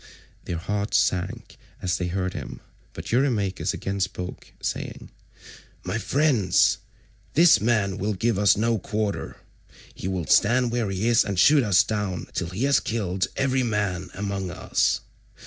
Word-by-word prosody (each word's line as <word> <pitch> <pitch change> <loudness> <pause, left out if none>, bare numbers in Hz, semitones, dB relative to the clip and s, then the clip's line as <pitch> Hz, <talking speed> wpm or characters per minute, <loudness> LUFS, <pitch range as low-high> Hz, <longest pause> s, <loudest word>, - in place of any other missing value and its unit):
Their 85 - -3
hearts 100 +4 -1
sank 90 +1 -1 0.2
as 90 -2 -1
they 90 - -1
heard 90 +1 -2
him, 70 -6 -7 0.3
but - - -7
Eurymachus 115 -7 +1
again 100 +1 -4
spoke 90 -1 -4
saying: - - -5 0.7
"My - - -2
friends, 130 - +2 0.6
this 170 +1 +6
man 105 -4 +1
will 105 +1 -1
give 110 +1 0
us 100 -1 +4
no 115 +1 +1
quarter. 105 +1 -3 0.6
He - - -6
will 95 -3 -2
stand 120 +7 +3
where 120 -4 -1
he 95 +3 -1
is 120 -1 +5
and 100 -2 -4
shoot 150 +7 +6
us 100 -2 +4
down 105 -6 -3
till 85 - -2
he 95 +7 -3
has 140 0 +4
killed 95 -5 -2
every 135 -1 +1
man 105 -6 -1
among 100 -1 -3
us. 90 - 0
100 Hz, 150 wpm, -25 LUFS, 95-115 Hz, 0.7 s, this